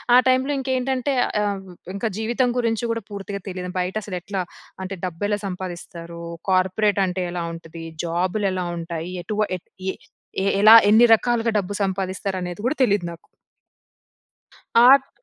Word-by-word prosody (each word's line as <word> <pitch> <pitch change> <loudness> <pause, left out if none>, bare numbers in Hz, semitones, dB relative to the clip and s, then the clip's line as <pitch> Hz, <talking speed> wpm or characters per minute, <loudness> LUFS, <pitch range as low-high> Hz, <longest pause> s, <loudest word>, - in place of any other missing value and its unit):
ఆ - - +9
టైమ్‌లో 260 +2 +3
ఇంకేంటంటే, 260 +1 -1 0.3
ఆహ్, 200 -2 -1 0.3
ఇంకా 200 +4 -2
జీవితం 240 +4 +1
గురించి 230 -1 0
కూడా 230 0 -2
పూర్తిగా 200 0 -5
తెలియదు. 180 -1 -5
బయట 180 +2 -2
అసలు 190 -3 -4
ఎట్లా, 195 +1 -3 0.4
అంటే 190 +1 -5
డబ్బు 175 0 -5
ఎలా 205 0 0
సంపాదిస్తారు. 175 -2 -7 0.3
కార్పొరేట్ 190 +2 +2
అంటే 185 0 -2
ఎలా 175 -1 -3
ఉంటది? 165 0 -9 0.2
జాబ్‌లు 180 +4 0
ఎలా 185 -1 -2
ఉంటాయి? 165 +1 -5
ఎటు 210 - -4 0.2
ఏ - - -16 0.8
ఏ - - 0 0.2
ఎలా, 215 +1 +8 0.2
ఎన్ని 220 +3 +7
రకాలుగా 235 0 0
డబ్బు 200 0 -2
సంపాదిస్తారు 190 0 -2
అనేది 180 +2 -5
కూడా 265 +5 +1
తెలీదు 205 -6 +2
నాకు. 170 - -9 1.7
ఆట్ 270 0 +6
195 Hz, 145 wpm, -23 LUFS, 180-225 Hz, 1.7 s, ఆ